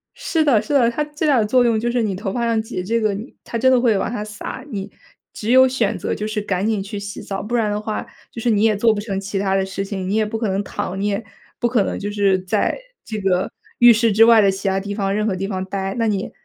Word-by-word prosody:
是 325 -2 0
的， 260 -8 +4
是 220 - -4
的， 250 -5 +4
它 270 +6 -1
最 300 +1 -3
大 275 -4 +4
的 215 - +2
作 250 +4 +3
用 230 -2 +2
就 240 +2 -1
是 245 0 +1
你 210 -4 -1
头 195 +1 -4
发 240 - -1
上 230 -1 +1
挤 200 -4 -5
这 230 +5 0
个 215 -2 +1 0.3
它 230 - -4
真 260 +3 +4
的 255 - +5
会 235 -4 +3
往 195 - -2
下 210 -3 -3
撒， 210 +4 -7
你 200 -2 -5 0.4
只 220 +2 -3
有 260 +1 +7
选 255 -4 0
择 - - -2
就 210 - -4
是 215 -1 -2
赶 195 -1 -1
紧 220 -2 0
去 200 +1 -6
洗 200 0 -7
澡， 195 -1 -4
不 230 +4 -3
然 225 -3 +1
的 205 - -1
话 215 0 -4 0.3
就 230 - -7
是 240 - +1
你 210 -2 +2
也 220 -1 +4
做 225 +2 +3
不 210 - -3
成 200 -3 -3
其 200 +1 -4
他 195 0 +1
的 195 0 +1
事 195 +1 -4
情， 190 -2 -4
你 200 - 0
也 220 0 +2
不 220 +2 -3
可 220 -1 -1
能 195 +1 -1
躺， 190 -1 -4
你 200 - 0
也 205 +2 -1 0.4
不 240 - +2
可 235 -4 +2
能 - - -3
就 205 +1 -4
是 200 -2 +2
在 185 - 0 0.3
这 215 -1 -5
个 190 -2 0 0.3
浴 240 -1 +8
室 230 0 +2
之 220 +3 +6
外 230 -1 +7
的 200 - +4
其 195 +1 -4
它 190 0 +1
地 200 +1 -5
方 195 -2 -1
任 210 +1 0
何 195 - 0
地 195 +1 -3
方 190 -2 -3
呆。 195 0 -3
那 230 -1 +1
你 200 -2 -2
210 Hz, 315 characters per minute, -20 LUFS, 195-230 Hz, 0.4 s, 浴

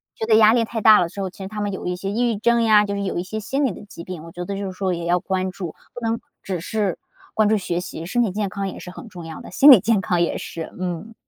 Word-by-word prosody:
觉 220 - -3
得 220 -1 +4
压 215 0 +7
力 235 -1 +3
太 225 0 -4
大 215 0 +8
了 170 - +1
之 200 +3 -6
后， 190 - -2
其 185 - -19
实 - - -5
他 215 +2 -6
们 205 -1 -1
有 190 - -6
一 180 - -1
些 195 +2 -4
抑 240 +3 +1
郁 - - -4
症 235 +2 +2
呀， 215 -2 +5
就 200 - -3
是 200 - -2
有 190 - -2
一 175 - -1
些 215 +4 -5
心 270 +7 -1
理 255 - +1
的 185 - -10
疾 180 -4 -10
病， 175 -3 -7
我 165 - -11
觉 175 +1 -6
得 200 - -4
就 200 - -3
是 190 - -4
说 185 0 -1
也 170 -1 -4
要 175 +1 +2
关 185 0 -2
注。 180 -4 -6 0.2
不 245 - -8
能 230 0 -1 0.2
只 185 -2 -3
是 205 -1 -1 0.4
关 215 -1 +4
注 215 - +3
学 175 -3 -2
习， 165 -2 -7
身 240 +8 0
体 215 - 0
健 205 +1 -2
康 195 +1 -3
也 - - -8
是 180 - -9
很 210 - -10
重 175 -5 -9
要 160 -1 -8
的， - - -10
心 280 +10 +8
理 250 - +10
健 210 +1 +2
康 175 -2 0
也 170 - 0
是， 165 -1 -6
嗯。 185 +4 -4
195 Hz, 345 characters per minute, -22 LUFS, 180-220 Hz, 0.4 s, 理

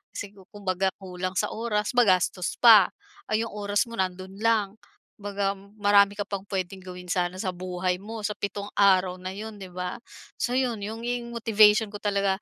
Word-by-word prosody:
Sigu 195 -2 -8
kumbaga 190 -2 -1
kulang 185 -1 -5
sa - - 0
oras, 215 -2 -1
magastos 185 -6 +2
pa. 220 -5 +8 0.4
Ah, 215 - +1
'yong 230 +1 -2
oras 205 +2 0
mo 230 - -11
nando'n 190 +1 -3
lang, 215 -4 +2 0.5
kumbaga 200 -1 -1 0.2
marami 205 0 +4
ka 205 - -1
pang 200 0 -5
puwedeng 190 -1 -3
gawin 180 -1 -9
sana 180 0 0
sa 185 -1 -2
buhay 180 0 -2
mo, 215 0 -6
sa 210 - -1
pitong 200 0 -5
araw 185 -2 +3
na 185 - -4
'yon, 215 0 -7
'di 185 - -8
ba? 180 +4 -5 0.4
So 245 +1 0
'yon, 240 -5 0
yung 235 +3 -4
motivation 215 -2 +4
ko 205 - -6
talaga 200 -1 0
200 Hz, 175 wpm, -26 LUFS, 185-215 Hz, 0.5 s, pa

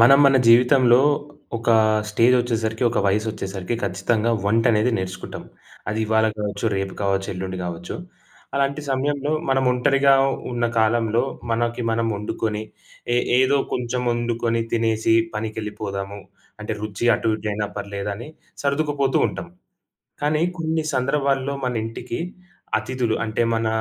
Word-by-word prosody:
మనం 135 +4 +8
మన 135 -1 +5
జీవితంలో 125 +1 +6 0.6
ఒక 115 - -4 0.4
స్టేజ్ 115 +4 +4
వచ్చేసరికి, 115 -1 -1
ఒక 120 - -1
వయసు 105 +3 +1
వచ్చేసరికి 95 +1 -4
ఖచ్చితంగా 105 +5 0
వంట 115 +3 +2
అనేది 110 +3 +2
నేర్చుకుంటాం. 95 -1 -6 0.5
అది 110 - -2
ఇవాళ 110 0 +3
కావచ్చు, 105 0 -3
రేపు 95 0 -3
కావచ్చు, 95 -1 0
ఎల్లుండి 95 0 -4
కావచ్చు. 85 0 -5 0.6
అలాంటి 140 +2 0
సమయంలో 145 +2 0 0.2
మనం 135 0 +2
ఒంటరిగా 140 +2 +3 0.4
ఉన్న 120 0 -1
కాలంలో 115 +1 +2 0.3
మనకి 120 +1 0
మనం 115 0 0
వండుకొని, 105 +1 -3 0.5
ఏ - - +3 0.2
ఏదో 130 +2 +4 0.2
కొంచెం 125 0 -1
వండుకొని, 120 -1 0
తినేసి 115 -1 +2 0.2
పనికెళ్ళిపోదాము. 105 -2 -4 0.4
అంటే 105 0 -3
రుచి 110 +1 -4
అటు 115 - -2
ఇటు 110 - -5
అయినా 105 0 -2
పర్లేదని 100 +4 -5 0.3
సర్దుకుపోతూ 140 -1 +1
ఉంటాం. 170 - -7 0.7
కానీ 150 +1 +1 0.2
కొన్ని 160 0 0
సందర్భాల్లో 135 +1 0
మన 125 - -1
ఇంటికి 115 +1 -5 0.6
అతిధులు 120 0 -1
అంటే, 110 +1 -1
మన 115 0 0
115 Hz, 130 wpm, -22 LUFS, 105-130 Hz, 0.7 s, మనం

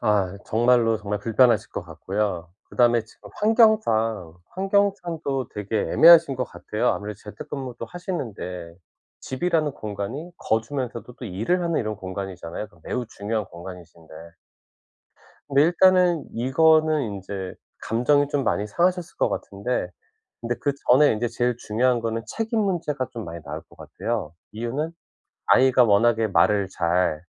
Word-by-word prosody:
아 100 -2 +1
정말로, 115 0 +3
정말 105 -1 -3
불편하실 115 +3 +3
것 - - -5
같고요. 95 -4 -3
그다음에 120 -2 +2
지금 105 -2 -16
환경상 205 - +2
환경상도 180 - -1
되게 105 +1 -3
애매하신 165 -4 +7
것 125 - -1
같아요. 115 0 -3
아무래도 105 0 -3
재택 105 0 -10
근무도 130 -4 -5
하시는데 110 - -6 0.5
집이라는 155 +1 -1
공간이 110 - -6
거주면서도 120 +1 -3
또 130 - -10
일을 115 - -1
하는 170 -2 0
이런 110 -2 -3
공간이잖아요. 95 -1 -6
그럼 85 - -24
매우 125 -2 -3
중요한 110 -1 -3
공간이신데 85 -2 -12 1.3
근데 140 +1 +4
일단은 180 -1 +4
이거는 155 +5 +3
인제 95 -3 -5 0.3
감정이 145 +5 +2
좀 145 -2 0
많이 105 -3 0
상하셨을 175 - 0
것 - - +2
같은데 100 0 -3 0.5
근데 120 +1 -2
그전에 140 +1 +3
인제 120 +2 -1
제일 120 0 -1
중요한 120 +2 +1
거는 115 0 -2
책임 225 - -2
문제가 170 -9 -1
좀 115 -2 -6
많이 85 0 -7
나올 70 - -6
것 - - -22
같아요. 110 -9 -4 0.2
이유는 120 +8 -3 0.6
아이가 130 -1 +5
워낙에 115 +1 +3
말을 100 -1 +3
잘 85 -3 0
120 Hz, 330 characters per minute, -24 LUFS, 100-145 Hz, 1.3 s, 애매하신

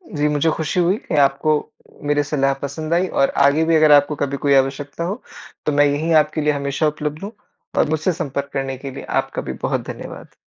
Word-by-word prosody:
जी, 150 0 +1
मुझे 150 +2 +1
खुशी 160 +3 -2
हुई 185 +4 +2
कि - - -3
आपको 140 +3 0 0.6
मेरी 145 0 +2
सलाह 135 -2 +2
पसंद 155 +3 -3
आई 180 +2 +2
और 135 - +4 0.2
आगे 145 +3 +3
भी 165 - +4
अगर 155 -1 +5
आपको 145 +1 +5
कभी 140 0 -2
कोई 140 - +4
आवश्यकता 135 +4 0
हो, 195 +8 -4 0.4
तो - - +1
मैं 145 0 +4
यही 145 +3 0
आपके 155 +1 -5
लिए 150 0 +2
हमेशा 140 +2 -1
उपलब्ध 150 +2 -4
हूँ 205 - -5 0.5
और - - +3
मुझसे 155 +4 +1
संपर्क 140 -2 -3
करने 135 -1 -3
के 135 +1 -7
लिए - - -8 0.2
आपका - - -6
भी - - -5
बहुत - - -1
धन्यवाद। - - -10
150 Hz, 210 wpm, -20 LUFS, 140-155 Hz, 0.6 s, अगर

